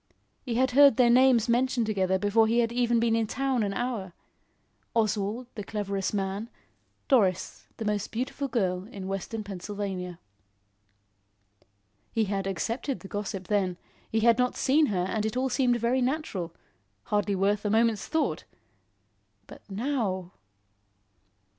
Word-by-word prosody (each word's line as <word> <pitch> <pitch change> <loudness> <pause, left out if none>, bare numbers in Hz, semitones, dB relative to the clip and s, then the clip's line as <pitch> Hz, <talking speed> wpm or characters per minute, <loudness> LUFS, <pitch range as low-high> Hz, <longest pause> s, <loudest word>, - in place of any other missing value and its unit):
He 240 -4 -4
had 260 +1 +2
heard 280 -1 +7
their 240 -2 +5
names 250 -2 +5
mentioned 240 0 +2
together 190 -3 +1
before 210 +3 +3
he 230 +2 +1
had 235 -1 +2
been 235 -1 +2
in 225 -1 +1
town 265 0 0
an 205 -2 0
hour. 210 -5 -3 0.8
Oswald, 215 +1 0
the 210 - -6
cleverest 200 -2 -2
man, 200 +2 -2 0.6
Doris, 195 -9 +1
the 220 - -4
most 210 -1 -1
beautiful 260 +4 -3
girl 190 -6 -1
in 195 -5 -7
Western 195 +3 -4
Pennsylvania. 190 -2 -5 1.9
He 225 - +1
had 195 -1 -2
accepted 230 - -2
the 195 - -9
gossip 195 -2 -4
then; 190 -4 0 0.3
he 220 - +1
had 235 +1 +4
not 250 0 +1
seen 295 +3 +3
her 180 -4 0
and 215 +2 -1
it 220 +3 -2
all 265 +1 +1
seemed 250 -1 +2
very 240 +3 +1
natural; 250 - -2 0.5
hardly 205 -1 0
worth 200 +2 +1
a 210 - 0
moment's 225 -1 +2
thought. 300 - -1 1.0
But - - -13
now! 200 -5 -2
220 Hz, 140 wpm, -28 LUFS, 195-245 Hz, 1.9 s, heard